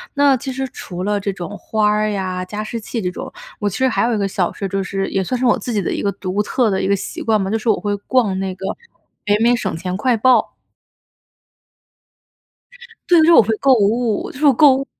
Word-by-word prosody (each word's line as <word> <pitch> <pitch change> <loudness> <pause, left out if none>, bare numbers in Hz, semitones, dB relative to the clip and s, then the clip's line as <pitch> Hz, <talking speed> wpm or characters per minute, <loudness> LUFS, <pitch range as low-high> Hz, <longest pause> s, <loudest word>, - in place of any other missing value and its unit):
那 285 -1 +4
其 265 +1 -5
实 265 +1 -3
除 180 -5 -7
了 205 0 0
这 200 0 -2
种 190 +2 -7
花 215 -1 0
儿 215 0 +1
呀、 185 -2 -3
加 210 +3 -5
湿 230 +2 -5
器 225 +2 -5
这 180 -1 -2
种。 - - -7 0.3
我 205 -1 0
其 200 - -6
实 260 - +2
还 - - 0
有 235 0 +1
一 - - -1
个 200 -1 0
小 185 -2 -1
事 200 - -5
儿， - - 0
就 195 0 -2
是 195 0 -3
也 190 -1 0
算 255 +7 -2
是 255 - 0
我 240 - +4
自 245 - -5
己 205 - +1
的 - - -2
一 - - -3
个 200 - 0
独 195 +1 -2
特 240 0 +1
的 190 - 0
一 - - -1
个 200 - +3
习 - - -6
惯 215 -2 +2
吧， 190 - -3
就 225 - +1
是 225 - -2
我 215 - +2
会 205 -1 -1
逛 225 -7 +2
那 190 -1 -3
个 190 +1 -8 0.6
北 205 0 +3
美 240 +2 +4
省 230 - -3
钱 180 +1 -4
快 240 +1 +1
报。 255 +3 +3 2.5
对， 350 -2 +6
就 - - +5
是 340 - +6
我 - - +8
会 220 +1 0
购 270 -1 +4
物， 220 +1 0
就 255 - -11
是 290 -2 +5
购 280 0 +6
物 275 +1 -4
210 Hz, 270 characters per minute, -19 LUFS, 195-245 Hz, 2.5 s, 我